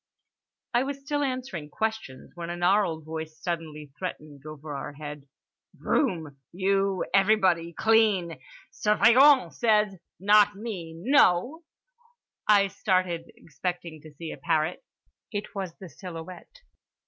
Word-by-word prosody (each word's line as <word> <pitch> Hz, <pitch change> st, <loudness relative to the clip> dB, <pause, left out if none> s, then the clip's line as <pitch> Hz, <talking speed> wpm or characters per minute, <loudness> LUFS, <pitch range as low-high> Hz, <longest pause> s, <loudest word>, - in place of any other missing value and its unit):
I 240 Hz, -, +4 dB
was 275 Hz, +1 st, -4 dB
still 290 Hz, +1 st, -2 dB
answering 255 Hz, -, -3 dB
questions, 220 Hz, -9 st, -4 dB
when 170 Hz, -1 st, -7 dB
a 175 Hz, -, -4 dB
gnarled 175 Hz, -3 st, +2 dB
voice 160 Hz, 0 st, -6 dB
suddenly 155 Hz, -4 st, -5 dB
threatened, 145 Hz, -2 st, -7 dB
over 155 Hz, -1 st, -7 dB
our 140 Hz, +1 st, -6 dB
head: 145 Hz, -1 st, -8 dB, 0.5 s
"Broom? 160 Hz, -, -1 dB
You. 195 Hz, +1 st, 0 dB
Everybody. 190 Hz, -4 st, +3 dB
Clean. 205 Hz, -9 st, +3 dB, 0.3 s
Surveillant 250 Hz, +6 st, +5 dB
says. 210 Hz, -3 st, +2 dB, 0.3 s
Not 205 Hz, +1 st, +5 dB
me, 195 Hz, -7 st, -6 dB
no?"—I 290 Hz, -, +1 dB
started, 185 Hz, -4 st, -1 dB
expecting 165 Hz, +1 st, -6 dB
to 155 Hz, -, -13 dB
see 165 Hz, +2 st, -7 dB
a -, -, -8 dB
parrot. 160 Hz, 0 st, -1 dB, 0.5 s
It 205 Hz, 0 st, -5 dB
was 190 Hz, -4 st, -5 dB
the 190 Hz, -, -10 dB
silhouette. 180 Hz, -, -10 dB
185 Hz, 115 wpm, -27 LUFS, 160-220 Hz, 0.5 s, Surveillant